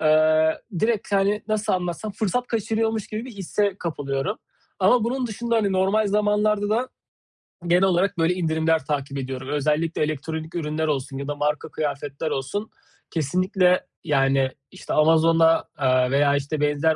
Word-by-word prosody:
aaa, 155 0 +4 0.3
direkt, 220 -2 0
hani, 200 +1 +2
nasıl 215 0 0
anlatsam 180 +3 -2
fırsat 235 +5 -1
kaçırıyormuş 225 -1 -1
gibi 215 +3 -4
bir 260 - -8
hisse 200 0 -1
kapılıyorum. 145 +3 -3 0.4
Ama 245 -3 +4
bunun 250 +2 -1
dışında, 235 +1 -2
hani, 205 -3 +1
normal 195 +3 +2
zamanlarda 210 0 +1
da 240 +4 +1 0.8
genel 175 +2 +4
olarak 190 0 +2
böyle 165 +2 +2
indirimler 160 -4 0
takip 140 -1 -3
ediyorum. 130 0 -5
Özellikle 150 +3 0
elektronik 155 +2 -4
ürünler 155 -1 -2
olsun 135 -2 -2
ya 140 +1 -5
da 145 - -3
marka 145 0 -1
kıyafetler 145 0 -3
olsun 205 +11 -3 0.4
kesinlikle 180 +4 +1 0.2
yani, 135 -4 +2 0.2
işte, 185 - -6
Amazon'da, 165 +1 +4
aaa, 130 -1 +2
veya, 140 0 +3
işte, 145 +2 -2
benzer 150 +2 +2
165 Hz, 145 wpm, -23 LUFS, 145-205 Hz, 0.8 s, aaa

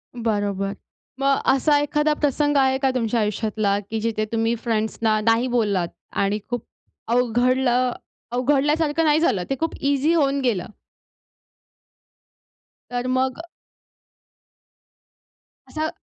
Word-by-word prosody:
बरोबर. 205 -4 -1 0.5
मग 275 0 +3
अ, - - -4
असा 290 +2 +3
एखादा 295 +1 +1
प्रसंग 290 0 +1
आहे 265 -1 +3
का 270 -1 +2
तुमच्या 230 -1 0
आयुष्यातला 210 -1 0
की 220 0 -2
जिथे 215 -1 -1
तुम्ही 225 +1 +1
फ्रेंड्स 220 -2 -1
ना 215 -1 +2
नाही 225 +3 +2
बोललात 200 -7 +1 0.4
आणि 200 +2 0
खूप 245 -2 -3 0.4
अवघडलं 250 +1 +2 0.4
अवघडल्यासारखं 295 +5 +1
नाही 300 0 +4
झालं. 230 - +1
ते 270 - 0
खूप 325 0 -1
ईझी 285 +3 +1
होऊन 280 -4 +2
गेलं? 225 -9 -1 2.2
तर 245 0 -2
मग. 260 +2 0 2.3
असं 315 0 -2
250 Hz, 115 wpm, -22 LUFS, 220-280 Hz, 2.3 s, नाही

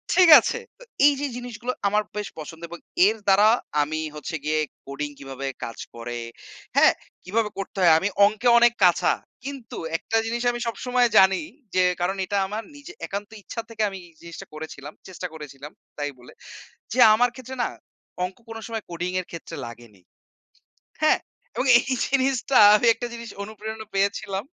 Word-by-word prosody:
ঠিক 365 -2 +6
আছে। 470 - -2 0.2
তো - - -14 0.2
এই 290 - +7
যে 290 - -1
জিনিসগুলো 245 0 -5 0.2
আমার 210 +1 +2
বেশ 210 -1 -3
পছন্দ 160 +2 -9
এবং 175 0 -9 0.3
এর 220 +2 +1
দ্বারা 200 +2 +6 0.3
আমি 155 +2 -2 0.2
হচ্ছে 150 +2 -5
গিয়ে 155 0 +1 0.3
কোডিং 140 +2 -4
কিভাবে 135 0 -6 0.2
কাজ 115 - -6 0.2
করে? 120 +1 -6 0.6
হ্যাঁ? - - +7 0.3
কিভাবে 215 +4 0
করতে 195 0 -6
হয় 170 -3 +7
আমি 195 - 0 0.2
অঙ্কে 215 +4 0
অনেক 240 0 +5
কাঁচা। 175 -2 +4 0.3
কিন্তু 275 -4 -7 0.2
একটা 225 - -1
জিনিস 235 +1 -2
আমি 240 - -5
সবসময় 245 +1 +1
জানি 190 0 +6 0.3
যে 185 - +4 0.2
কারণ 190 +3 0
এটা 200 +2 -2
আমার 215 +3 -4
নিজে 290 +5 -11
একান্ত 200 +1 -5
ইচ্ছা 230 - -5
থেকে 225 -1 -5
আমি 195 - -8
এই 170 - -21
জিনিসটা 170 -1 -9
করেছিলাম, 155 -1 -8
চেষ্টা 185 -1 -6
করেছিলাম 150 -2 -10 0.3
তাই 145 -1 -2
বলে। 125 - -15 0.6
যে 245 - -3 0.2
আমার 245 +3 +3
ক্ষেত্রে 260 0 -8
না - - 0 0.6
অঙ্ক 180 +1 -5
কোন 225 0 -7
সময় 225 -2 -4
কোডিং 175 +1 -3
এর 180 - -9
ক্ষেত্রে 165 - -8
লাগেনি। 115 -5 -13 1.0
হ্যাঁ? 310 - +5 0.4
এবং 260 - -1
এই - - -9 0.2
জিনিসটা 270 -1 +1 0.2
আমি 240 - 0
একটা 240 - -5
জিনিস 235 -1 -8
অনুপ্রেরণা 220 +1 -7
পেয়েছিলাম 200 0 -1
200 Hz, 170 wpm, -24 LUFS, 160-235 Hz, 1.0 s, এই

